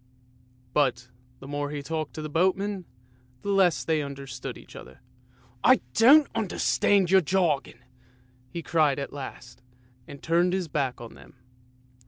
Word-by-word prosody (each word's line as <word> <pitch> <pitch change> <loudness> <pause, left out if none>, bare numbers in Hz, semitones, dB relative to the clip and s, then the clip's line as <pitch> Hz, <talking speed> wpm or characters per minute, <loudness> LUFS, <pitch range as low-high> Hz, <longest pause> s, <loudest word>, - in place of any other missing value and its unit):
But 125 -4 +1 0.3
the 135 - -10
more 145 0 -3
he 145 -1 -5
talked 155 0 -4
to 155 - -5
the - - -4
boatmen, 190 +4 0 0.6
the 200 - -1
less 175 -10 +3
they 160 +1 0
under 140 -1 -7
stood 125 -1 -7
each - - -15
other. 65 +1 -12 0.3
" 125 -1 -31
I 255 0 +5
don't 280 +6 +7
understand 195 -2 +1
your 190 0 +6
jargon," 155 -8 -1 0.7
he 170 +5 -6
cried 155 -5 +2
at 140 -1 -5
last, 130 -2 -9 0.5
and 140 - -10
turned 175 +2 +2
his 185 -2 -1
back 140 -5 -2
on 115 -1 -10
them. - - -17
155 Hz, 155 wpm, -26 LUFS, 135-185 Hz, 0.7 s, don't